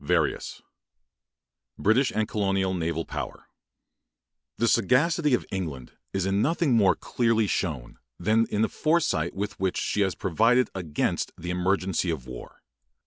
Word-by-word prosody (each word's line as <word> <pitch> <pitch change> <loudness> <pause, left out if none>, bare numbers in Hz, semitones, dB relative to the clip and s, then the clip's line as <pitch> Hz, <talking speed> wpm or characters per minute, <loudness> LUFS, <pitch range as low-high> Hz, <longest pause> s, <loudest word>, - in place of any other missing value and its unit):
Tennyson - - -1 1.1
BRITISH 115 +6 +3 0.2
COLONIAL 95 -2 0
AND 90 - -2
NAVAL 80 -1 -2
POWER - - -6 1.1
The 115 - +1
sagacity 145 - +3
of - - -4
England 80 -10 -4 0.2
is 95 -1 -1
in 95 +1 +1
nothing 165 -1 +1
more 105 -5 +4
clearly 115 -2 +1
shown 75 -11 -3 0.2
than 110 +5 +2
in 105 +1 0
the - - +3
foresight 155 - 0
with 100 0 -4
which 95 -1 0
she 105 - -1
has 95 -2 +1
provided 115 +7 +2
against 85 -6 -2
the 90 +1 -5
emergency 95 0 0
of 75 -7 -3
war. 65 -1 -10
95 Hz, 140 wpm, -26 LUFS, 90-115 Hz, 1.1 s, more